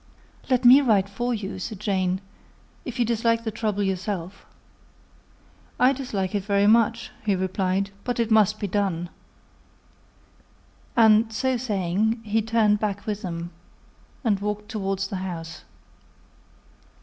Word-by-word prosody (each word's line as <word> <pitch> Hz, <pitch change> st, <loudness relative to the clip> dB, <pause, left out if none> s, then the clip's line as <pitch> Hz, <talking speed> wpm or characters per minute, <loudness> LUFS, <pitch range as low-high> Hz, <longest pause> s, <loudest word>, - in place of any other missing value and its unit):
"Let 255 Hz, -1 st, +2 dB
me 260 Hz, +4 st, +9 dB
write 210 Hz, -7 st, +3 dB
for 240 Hz, +5 st, -3 dB
you," 205 Hz, -4 st, -4 dB
said 210 Hz, +1 st, -6 dB
Jane, 190 Hz, -2 st, 0 dB, 0.6 s
"if 255 Hz, -1 st, -6 dB
you 240 Hz, -, +2 dB
dislike 230 Hz, 0 st, +1 dB
the 220 Hz, -, -2 dB
trouble 210 Hz, -1 st, -1 dB
yourself." 190 Hz, -1 st, -4 dB, 1.3 s
"I 255 Hz, +2 st, +5 dB
dislike 210 Hz, -8 st, -3 dB
it 205 Hz, -2 st, -1 dB
very 200 Hz, 0 st, +2 dB
much," 230 Hz, +1 st, +3 dB
he 205 Hz, -2 st, +1 dB
replied; 190 Hz, +1 st, -1 dB
"but 245 Hz, -1 st, -2 dB
it 230 Hz, -1 st, 0 dB
must 215 Hz, -1 st, +4 dB
be -, -, -2 dB
done." 190 Hz, -3 st, -1 dB, 1.9 s
And 220 Hz, 0 st, +5 dB
so 260 Hz, +3 st, 0 dB
saying, 215 Hz, -1 st, 0 dB
he 220 Hz, +1 st, 0 dB
turned 215 Hz, -2 st, +2 dB
back 205 Hz, -1 st, -3 dB
with 210 Hz, -1 st, -3 dB
them, 170 Hz, -1 st, -5 dB, 0.7 s
and 210 Hz, -5 st, +1 dB
walked 210 Hz, +1 st, -4 dB
towards 195 Hz, -3 st, -2 dB
the 195 Hz, -, -4 dB
house. 165 Hz, -4 st, -6 dB
210 Hz, 135 wpm, -24 LUFS, 190-230 Hz, 1.9 s, me